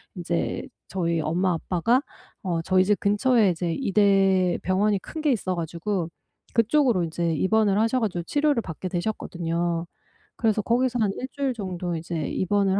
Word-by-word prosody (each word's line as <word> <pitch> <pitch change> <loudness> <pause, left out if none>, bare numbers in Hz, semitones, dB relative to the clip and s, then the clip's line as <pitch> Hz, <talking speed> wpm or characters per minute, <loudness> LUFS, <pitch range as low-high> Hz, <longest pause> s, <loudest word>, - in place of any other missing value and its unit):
인제 175 -1 -2 0.2
저희 170 -3 -1
엄마 175 +4 +1
아빠가 185 - +1 0.4
어 170 -3 -1
저희 185 +2 +3
집 210 0 +3
근처에 210 +1 +3
이제 170 -1 -1
이대 195 -5 +3
병원이 195 +2 +2
큰 315 - -8
게 295 -3 +3
있어 185 -5 -2
가지고 170 +2 -2 0.5
그쪽으로 230 - +3
이제 165 0 -1
입원을 205 +3 +2
하셔 225 +4 +2
가지고 185 -7 -2
치료를 290 - +1
받게 180 -1 -6
되셨거든요. 175 -3 -2 0.5
그래서 220 -2 +1
거기서 245 +3 +1
한 205 - +2
1 255 - -5
주일 275 -3 -1
정도 180 -5 -4
이제 165 -1 -3
입원을 195 +1 +1
190 Hz, 330 characters per minute, -25 LUFS, 175-220 Hz, 0.5 s, 저희